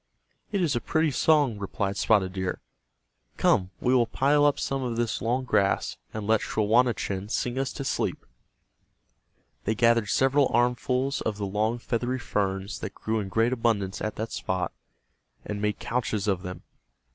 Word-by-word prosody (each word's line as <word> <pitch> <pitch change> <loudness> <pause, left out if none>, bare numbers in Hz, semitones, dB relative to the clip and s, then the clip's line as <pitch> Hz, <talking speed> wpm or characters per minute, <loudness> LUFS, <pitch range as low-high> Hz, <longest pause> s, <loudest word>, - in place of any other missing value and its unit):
"It 200 -3 +1
is 150 -6 +1
a 120 - 0
pretty 160 +6 +1
song," 140 -5 +3
replied 100 0 -2
Spotted 100 -4 +2
Deer. 95 -1 -2 0.8
"Come, 90 -1 +3
we 125 - +2
will 120 -3 +4
pile 145 +5 +3
up 145 - +3
some 135 0 -1
of 120 -3 -2
this 115 -2 -1
long 125 +3 0
grass, 100 -6 +1 0.2
and 110 -1 -5
let 110 +1 +3
Schawanachen 110 -3 +1
sing 125 +2 -1
us 135 -1 -1
to - - -5
sleep." - - -2 1.4
They 110 - +1
gathered 115 -2 +3
several 135 +3 +3
armfuls 125 +3 +1
of 105 -2 -2
the 105 - -2
long 105 +4 0
feathery 120 +1 -2
ferns 100 -3 -2
that - - -6
grew 110 0 -1
in 100 -2 -4
great 115 +5 +2
abundance 110 -5 0
at 110 - -2
that 110 +1 -4
spot, 90 -1 -2 0.7
and 105 -1 -4
made 105 0 0
couches 110 -4 -2
of 95 -3 +1
them. 90 -1 -7
115 Hz, 165 wpm, -27 LUFS, 100-125 Hz, 1.4 s, will